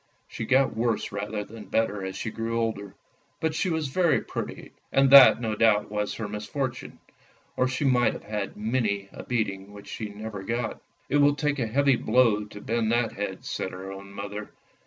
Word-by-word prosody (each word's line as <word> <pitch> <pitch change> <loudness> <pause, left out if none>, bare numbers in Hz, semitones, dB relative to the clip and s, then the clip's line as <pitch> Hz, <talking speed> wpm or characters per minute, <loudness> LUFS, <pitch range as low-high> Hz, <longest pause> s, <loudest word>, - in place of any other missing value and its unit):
" - - -42
She - - -3
got 130 +3 +3
worse 115 -1 0
rather 105 +1 -3
than 105 0 -11
better 105 -3 0
as 95 0 -4
she 110 - -4
grew 115 +1 -2
older; 100 -4 -3 0.4
but 160 -1 0
she 165 +4 0
was 160 -4 -1
very 170 +3 +3
pretty, - - -6 0.2
and 135 -1 +4
that 135 -4 +10
no 110 -3 -2
doubt 105 -1 +3
was 105 -1 -2
her 110 - -4
misfortune, 105 +5 -4 0.6
or 130 - +2
she 130 +3 -2
might 125 -2 +3
have - - -9
had 105 -2 -4
many 105 -3 -1
a - - -9
beating 100 -4 -2
which 100 0 -12
she 110 - -5
never 105 0 -7
got. 115 +4 -3
" - - -39
It 145 - +3
will 145 0 +5
take 145 0 -1
a 120 - 0
heavy 135 +2 +3
blow 115 -5 +3
to 105 0 -11
bend 115 -1 0
that 120 -1 +1
head," 95 -1 -5
said 95 - -3
her 95 +1 -7
own 100 0 -9
mother. 100 +1 -6
110 Hz, 200 wpm, -26 LUFS, 105-130 Hz, 0.6 s, that